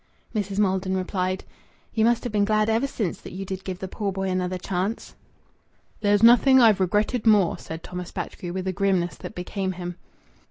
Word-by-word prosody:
Mrs. 200 -3 -2
Maldon 190 -2 +1
replied 185 0 -2 0.5
"You 220 -1 +2
must 235 0 +2
have 245 - -4
been 205 -1 +3
glad 215 +1 +2
ever 230 +5 +1
since 210 -9 -3
that - - -10
you 195 +1 -5
did 190 0 -5
give 185 -2 -4
the 190 - -5
poor 200 +1 -3
boy 190 0 -2
another 185 0 -1
chance." 190 +4 -3 0.9
"There's 205 0 +2
nothing 245 +3 +7
I've 220 -5 +6
regretted 210 +5 +1
more," 205 -5 +4
said 160 +1 -8
Thomas 180 -1 -6
Batchgrew, 175 - -5
with 185 +1 -4
a 185 - 0
grimness 185 -2 +1
that - - -9
became 185 +1 -3
him. 175 -1 -6
195 Hz, 190 wpm, -25 LUFS, 185-215 Hz, 0.9 s, nothing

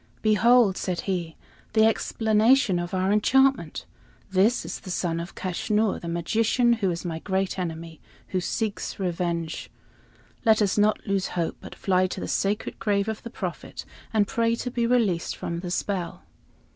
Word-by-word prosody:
"Behold," 220 -1 +4
said 180 -2 -2
he, 175 -4 -3 0.4
"the 220 0 +5
explanation 220 -1 +3
of 175 0 -4
our 190 +1 +1
enchantment! 265 +6 +2 0.5
This 200 +6 +3
is - - -5
the 185 - -11
son 170 -2 -1
of 170 +2 -7
Kaschnur, 210 +3 0
the 170 - -6
magician, 225 +8 +2
who 215 -5 0
is 170 +1 -4
my 165 -2 -3
great 190 +1 -1
enemy, 165 -2 -5 0.3
who 185 - -1
seeks 215 +3 -3
revenge. 170 -3 -2 0.7
Let 220 -2 +5
us 205 -3 +2
not 210 +1 +2
lose 195 -2 0
hope, 170 -1 -1
but - - -10
fly 185 -1 +2
to 185 - -6
the - - -4
sacred 205 +2 -1
grave 205 -2 +1
of 220 -1 -3
the 235 - -7
Prophet - - -6 0.3
and 215 -2 +3
pray 230 +1 +1
to 250 +1 -4
be 235 -1 0
released 220 -9 +1
from 170 0 -4
the 180 0 -5
spell." 180 -1 -3
195 Hz, 165 wpm, -25 LUFS, 175-220 Hz, 0.7 s, the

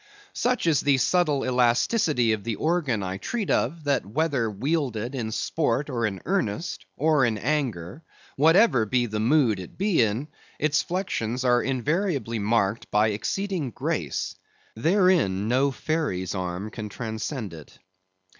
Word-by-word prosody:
Such 250 -4 0
is 160 -4 +3
the 140 -2 +3
subtle 150 0 +2
elasticity 125 - +2
of 105 -2 -4
the 115 -2 -2
organ 150 - 0
I 95 0 -3
treat 210 - -3
of, 155 +6 0
that 140 -4 +1
whether 130 - 0
wielded 125 0 -2
in 115 -5 -3
sport, 145 +2 -1
or 115 -3 0
in 95 -2 -6
earnest, 110 - -2
or 150 -1 +3
in 115 -3 +1
anger, 125 - -2 0.3
whatever 155 - +4
be 120 +3 +1
the 110 -2 -3
mood 120 -3 +3
it 90 - -10
be 195 -6 +2
in, 115 +6 0 0.3
its 150 0 +2
flexions 130 - -2
are 120 -1 +4
invariably 135 - -1
marked 110 0 0
by 105 +1 +3
exceeding 175 - -2
grace. - - -3 0.4
Therein 160 - +2
no 130 +4 +3
fairy's 135 - -2
arm 90 +2 -4
can 105 -2 -6
transcend 110 - -5
it. 80 -3 -12
125 Hz, 145 wpm, -25 LUFS, 110-155 Hz, 0.4 s, whatever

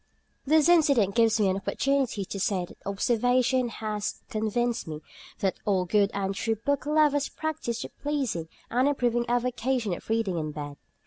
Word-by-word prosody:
This 310 +1 +5
incident 280 - +4
gives 225 0 +3
me 205 - +3
an 190 0 +1
opportunity 255 -1 0
to 195 - -6
say 190 -2 0
that - - -16
observation 245 +4 +2
has 215 -2 -4
convinced 230 +2 -1
me 155 -1 -6 0.4
that 190 -1 0
all 190 -3 +1
good 200 +2 +3
and 195 -1 -2
true 225 +3 -1
book 285 +6 -1
lovers 300 -2 +3
practise 305 -7 -3
the - - -7
pleasing 265 - -2 0.2
and 255 +3 +3
improving 240 -4 +1
avocation 245 -2 0
of 175 - -8
reading 220 -6 0
in 155 -1 -4
bed. 145 -1 -6
230 Hz, 165 wpm, -27 LUFS, 200-260 Hz, 0.4 s, This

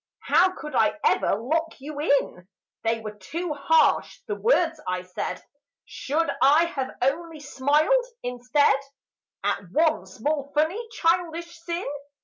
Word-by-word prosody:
How 370 +1 +4
could 300 -1 -8
I 225 +3 +2
ever - - +3
lock 315 +10 -2
you 290 +2 -7
in? 280 - 0 0.4
They 225 0 0
were 215 -1 -5
too 305 - -4
harsh, 295 +3 +2
the 420 - -3
words 350 -8 +1
I 180 0 -2
said. 180 0 -5 0.4
Should 320 +4 -1
I 300 +5 +6
have 270 -6 -3
only 320 +4 -1
smiled, 295 - +2 0.2
instead, 250 +3 +2 0.7
At 185 - -1
one 310 - +2
small 280 +8 -3
funny 345 +10 +1
childish 340 -4 0
sin? 340 +2 -4
300 Hz, 130 wpm, -25 LUFS, 260-335 Hz, 0.7 s, I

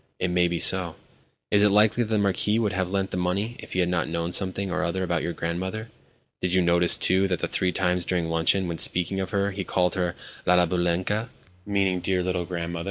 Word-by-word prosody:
"It 90 - -1
may 90 0 +2
be 85 0 -2
so." 85 -1 +3 0.6
"Is 100 - +4
it 105 - +5
likely 105 +3 +3
that 110 - -2
the 110 - +1
Marquis 100 +1 +1
would 105 -3 0
have 95 -1 -1
lent 95 0 -2
the - - -3
money 95 +6 -2
if - - -10
he 90 - +1
had 90 - 0
not 90 -1 0
known 85 +1 -3
something 95 +1 0
or 90 - -1
other 90 +2 -2
about 85 -3 -1
your - - -2
grandmother? 95 +7 -4 0.5
Did 90 0 0
you 95 - +4
notice, 85 0 +4
too, 95 +1 +2
that 90 -3 -1
three 90 - -1
times 90 -1 0
during 90 -3 -1
luncheon, 80 +3 +1
when 85 -1 -4
speaking 90 +2 +1
of 95 -1 -3
her, 100 0 0
he 95 0 -4
called 90 -1 0
her 90 -2 -1 0.3
'La 90 0 +5
Baboulenka'?. 90 +6 -1
90 Hz, 205 wpm, -25 LUFS, 85-100 Hz, 0.6 s, it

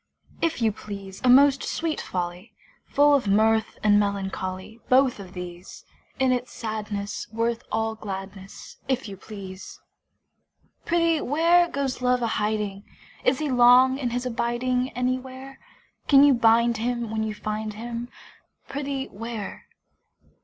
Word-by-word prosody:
If 325 -7 0
you 220 - +3
please, 200 -2 -9
A 255 - +3
most 275 +2 +6
sweet 325 -2 -2
folly! 180 +3 -5 0.3
Full 290 0 +4
of 275 -7 +2
mirth 220 +2 +2
and 205 -1 +5
melancholy: 195 +1 -3
Both 255 -2 +4
of 185 -2 -10
these! 180 0 -9 0.3
In 260 -1 +2
its 250 0 -1
sadness 210 -2 -4
worth 230 +1 -1
all 225 0 0
gladness, 195 -2 -8
If 260 -2 -1
you 200 - -7
please! 195 -2 -10 1.1
Prithee 335 -2 +2
where, 335 +5 +3
Goes 275 -4 -3
Love 250 -1 +2
a - - +1
hiding? 210 -2 -2 0.4
Is 255 - +3
he 300 -1 -2
long 250 +2 +6
in 250 -4 -1
his 245 +1 -3
abiding 250 +1 -1
Anywhere? 255 +2 -4 0.5
Can 275 -1 +7
you 285 -1 +7
bind 235 0 +4
him 235 0 -2
when 220 0 -1
you 215 -1 -2
find 215 0 -4
him; 235 +2 -6 0.6
Prithee, 275 -1 -3
where? 225 0 -7
235 Hz, 140 wpm, -25 LUFS, 210-260 Hz, 1.1 s, Can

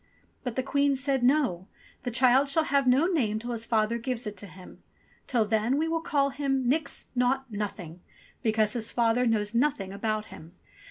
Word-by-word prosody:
But 250 -3 -4
the 260 - -1
Queen 280 +1 +1
said, 270 0 0
"No! 245 - +1 0.3
The - - -3
child 255 +3 +4
shall 320 +3 +3
have 280 -3 +1
no 260 +6 +4
name 260 - 0
till 240 +3 -5
his 230 -1 -3
father 225 +1 +1
gives 245 0 -4
it 210 -1 -5
to 205 - -4
him. 185 -1 -14 0.5
Till 235 -4 +1
then 220 +5 +1
we 315 +2 0
will 330 0 -1
call 280 -4 +1
him 270 -2 -1
*Nix! 280 +2 0
Naught! 255 +1 0
Nothing 190 -5 -6 0.2
!' - - -29
because 220 -2 +2
his 230 -2 -1
father 240 +1 +2
knows 210 -1 0
nothing 235 -7 0
about 215 +1 -2
him!" 165 +3 -13
245 Hz, 195 wpm, -27 LUFS, 215-275 Hz, 0.5 s, child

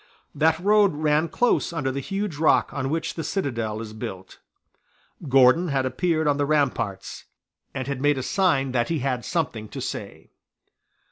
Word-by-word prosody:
That 160 +2 +2
road 200 -1 +3
ran 155 +1 +1
close 245 +2 +1
under 145 -6 -2
the 135 - -3
huge 195 +2 -4
rock 155 +1 +3
on 135 -2 -2
which 160 +2 -2
the 165 - -5
citadel 115 - -2
is 110 -1 -8
built. 95 -3 -8 0.9
Gordon 135 +6 +5
had 135 -3 0
appeared 155 +4 0
on 145 -1 +2
the 145 - +1
ramparts, 125 -10 -1 0.5
and 130 -1 -3
had 140 -2 -3
made 145 0 +2
a 130 - -3
sign 135 -4 +1
that 120 -2 0
he 165 - 0
had 125 -3 -2
something 125 - -3
to - - -7
say. - - -7
145 Hz, 165 wpm, -24 LUFS, 130-165 Hz, 0.9 s, Gordon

